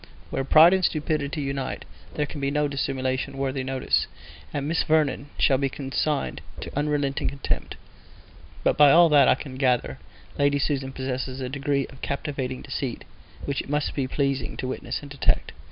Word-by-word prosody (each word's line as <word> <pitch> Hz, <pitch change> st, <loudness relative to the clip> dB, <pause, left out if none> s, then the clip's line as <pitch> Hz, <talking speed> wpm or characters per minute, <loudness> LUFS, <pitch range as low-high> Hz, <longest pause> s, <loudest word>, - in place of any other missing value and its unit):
Where 135 Hz, -, -1 dB
pride 160 Hz, +6 st, +7 dB
and 190 Hz, -1 st, +2 dB
stupidity 150 Hz, -2 st, 0 dB
unite 135 Hz, -1 st, -3 dB, 0.3 s
there 150 Hz, -, 0 dB
can 145 Hz, 0 st, -8 dB
be 140 Hz, -, +1 dB
no 150 Hz, +1 st, +1 dB
dissimulation 135 Hz, -1 st, -2 dB
worthy 135 Hz, -1 st, -1 dB
notice, 130 Hz, 0 st, 0 dB, 0.4 s
and 145 Hz, 0 st, -2 dB
Miss 160 Hz, +1 st, +1 dB
Vernon 150 Hz, -3 st, +1 dB
shall 135 Hz, -2 st, +3 dB
be 135 Hz, -1 st, +1 dB
consigned 140 Hz, +2 st, -2 dB, 0.2 s
to -, -, -7 dB
unrelenting 145 Hz, -1 st, 0 dB
contempt; 140 Hz, 0 st, -3 dB, 0.9 s
but -, -, +2 dB
by 150 Hz, -1 st, +8 dB
all 170 Hz, +3 st, +7 dB
that 145 Hz, -3 st, +6 dB
I -, -, +6 dB
can 130 Hz, -1 st, -8 dB
gather 125 Hz, -, +1 dB, 0.4 s
Lady 140 Hz, 0 st, +3 dB
Susan 135 Hz, -1 st, -1 dB
possesses 130 Hz, 0 st, -4 dB
a 130 Hz, -1 st, -3 dB
degree 140 Hz, 0 st, 0 dB
of 135 Hz, -, -15 dB
captivating 140 Hz, -3 st, -3 dB
deceit 135 Hz, -3 st, -4 dB, 0.4 s
which 140 Hz, -1 st, -1 dB
it -, -, -12 dB
must 150 Hz, 0 st, 0 dB
be 135 Hz, -3 st, -1 dB
pleasing 140 Hz, -1 st, -1 dB
to 130 Hz, -, -3 dB
witness 130 Hz, -, -4 dB
and 140 Hz, -, -10 dB
detect. 140 Hz, -, +1 dB
140 Hz, 170 wpm, -25 LUFS, 135-145 Hz, 0.9 s, by